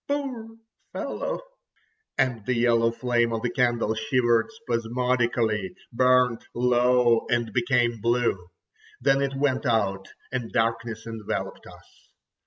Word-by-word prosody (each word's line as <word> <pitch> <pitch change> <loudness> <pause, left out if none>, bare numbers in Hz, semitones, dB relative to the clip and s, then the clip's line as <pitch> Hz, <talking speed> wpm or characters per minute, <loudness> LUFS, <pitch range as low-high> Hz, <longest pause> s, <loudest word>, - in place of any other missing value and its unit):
"Poor 255 -6 -4 0.4
fellow!" - - -3 0.8
And 125 -5 +1
the 125 - +1
yellow 115 -1 +3
flame 120 0 0
of 115 0 -3
the 120 - 0
candle 120 -3 +1
shivered 120 0 +2
spasmodically, 120 - -1 0.2
burnt 125 -1 +3
low, 125 -1 +3
and 120 -3 0
became 120 -2 +1
blue. 115 -6 0 0.5
Then 135 +2 +3
it 135 -1 -1
went 135 -1 0
out—and 110 +2 -2
darkness 115 -1 -1
enveloped 115 -2 -5
us. - - -18
120 Hz, 110 wpm, -25 LUFS, 115-125 Hz, 0.8 s, yellow